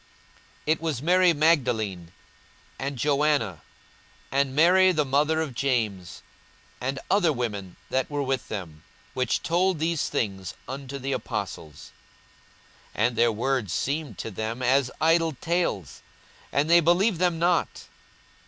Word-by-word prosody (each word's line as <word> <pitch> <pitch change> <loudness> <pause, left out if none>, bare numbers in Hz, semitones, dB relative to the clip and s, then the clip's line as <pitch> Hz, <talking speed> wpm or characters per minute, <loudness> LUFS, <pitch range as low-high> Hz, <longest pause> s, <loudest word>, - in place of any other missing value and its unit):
42:024:010 - - -31 0.6
It 160 - -8
was 155 -7 -2
Mary 180 +2 +5
Magdalene 120 - +1 0.7
and 140 0 -3
Joanna, 140 - +1 0.7
and 135 0 +1
Mary 185 +4 +6
the 155 -4 +1
mother 150 +4 +2
of 155 -5 -4
James, 110 -9 -2 0.6
and 135 +2 -2
other 190 -5 +4
women 105 -8 -4 0.2
that 130 0 0
were 145 -1 -2
with 135 -2 -2
them, 85 -8 -7 0.3
which 125 -2 -1
told 180 +1 +1
these 160 0 -1
things 95 -4 -3
unto 135 +1 -6
the 135 +1 -4
apostles. 95 - -5 1.0
42:024:011 - - +2
And 120 - -5
their 120 0 +3
words 115 -2 -1
seemed 150 +2 -2
to 115 - -5
them 110 +5 -4
as 130 +1 +3
idle 165 +1 +3
tales, 165 - -2 0.5
and 140 +2 +1
they 170 +1 +6
believed 175 +3 +2
them 175 -2 +2
not. 170 +1 0
140 Hz, 135 wpm, -26 LUFS, 115-160 Hz, 1.0 s, Mary